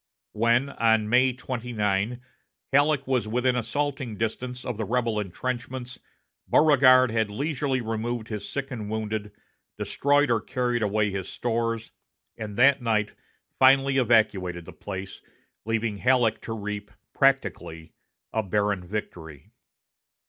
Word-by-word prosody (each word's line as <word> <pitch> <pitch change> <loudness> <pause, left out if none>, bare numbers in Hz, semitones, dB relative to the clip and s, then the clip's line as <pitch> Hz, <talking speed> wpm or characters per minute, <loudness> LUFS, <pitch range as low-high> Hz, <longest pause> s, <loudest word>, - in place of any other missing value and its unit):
When, 115 +5 +2
on 110 -4 +2
May 125 +2 +4
29, 120 -3 -2 0.5
Halleck 145 0 +3
was 130 -4 0
within 125 +3 +1
assaulting 125 -1 -2
distance 125 +3 -4
of 125 - -3
the 110 - -2
rebel 115 0 0
intrenchments 125 +5 -5 0.5
Beauregard 130 -5 +6
had 110 -2 0
leisurely 135 +2 -1
removed 115 0 -3
his 105 -3 -5
sick 140 -1 -4
and 110 -4 -5
wounded, 110 -1 -3 0.5
destroyed 145 -1 +2
or 115 -2 +2
carried 125 -2 -1
away 105 0 +1
his 95 -1 -4
stores, 115 -1 -2 0.4
and 105 -2 -7
that 135 +1 +5
night 110 -3 0 0.5
finally 135 +1 +5
evacuated 100 -8 +2
the - - -11
place, 95 -1 -7 0.4
leaving 110 -1 -1
Halleck 120 -1 +2
to 115 - -5
reap, 105 -1 -5 0.2
practically, 80 0 0 0.4
a 110 - +1
barren 100 -2 0
victory. 85 -6 -7
115 Hz, 125 wpm, -26 LUFS, 105-130 Hz, 0.5 s, Beauregard